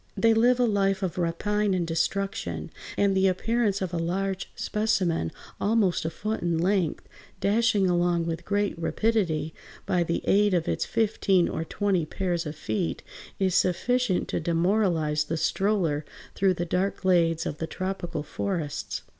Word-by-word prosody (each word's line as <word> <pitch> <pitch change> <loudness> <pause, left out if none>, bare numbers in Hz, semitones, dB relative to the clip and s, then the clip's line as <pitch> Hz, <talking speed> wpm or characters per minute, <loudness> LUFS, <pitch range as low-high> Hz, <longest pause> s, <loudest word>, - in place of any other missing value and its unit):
They 230 0 +4
live 240 +3 +4
a 245 - +4
life 195 -3 +1
of 180 -1 -2
rapine 200 +4 0
and 175 -2 0
destruction, 165 - -2 0.3
and 200 -1 +3
the 190 0 +4
appearance 205 +1 +1
of 180 -2 -4
a 170 - -1
large 190 +3 -2
specimen 185 - 0 0.3
almost 205 -6 +2
a - - +1
foot 215 +6 -3
in 170 -1 0
length, 180 -1 0 0.3
dashing 210 -1 +2
along 175 -1 +2
with 165 -1 -3
great 205 0 0
rapidity 165 -5 0 0.3
by 180 - +1
the 170 0 -1
aid 205 -1 +4
of 170 -2 0
its - - 0
fifteen 200 -5 +2
or 160 - -3
twenty 185 -2 0
pairs 175 -3 -2
of 150 - -5
feet, 110 - -3 0.3
is 190 -2 +1
sufficient 205 +4 +1
to - - -1
demoralize 165 -3 +1
the 160 +2 -2
stroller 180 -5 +1 0.3
through 190 -1 +2
the 175 - -2
dark 185 +3 -1
glades 170 -3 +2
of 145 - -4
the 160 - -2
tropical 185 -3 -4
forests. 165 -4 -3
185 Hz, 155 wpm, -26 LUFS, 165-205 Hz, 0.3 s, They